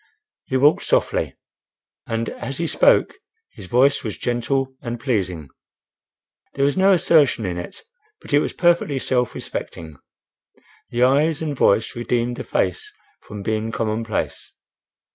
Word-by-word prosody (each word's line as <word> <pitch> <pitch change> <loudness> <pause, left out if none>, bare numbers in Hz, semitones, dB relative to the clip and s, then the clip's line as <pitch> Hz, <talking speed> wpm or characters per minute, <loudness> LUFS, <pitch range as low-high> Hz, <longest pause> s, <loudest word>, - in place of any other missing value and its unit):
He 130 - -1
walked 145 +4 +4
softly, - - 0 0.7
and 115 0 -2
as 135 - -6
he 170 - -1
spoke - - +3 0.4
his 100 -5 -12
voice 135 +6 +3
was 110 -3 -5
gentle 130 +2 -1
and 120 0 -5
pleasing. 95 - -2 1.1
There 140 - +2
was 140 - +1
no 195 +1 +5
assertion 150 - +3
in 90 -1 -3
it, 85 - -9 0.4
but - - -9
it 145 - +6
was - - -1
perfectly 170 -5 +2
self 125 -2 -1
respecting. 80 -3 -7 0.9
The 120 +1 +1
eyes 145 +4 +3
and 150 -2 -3
voice 110 0 +2
redeemed 120 0 -1
the - - -5
face 435 -1 -2 0.3
from 105 -1 -9
being 110 +1 -2
commonplace. 110 -1 -3
125 Hz, 140 wpm, -21 LUFS, 110-140 Hz, 1.1 s, it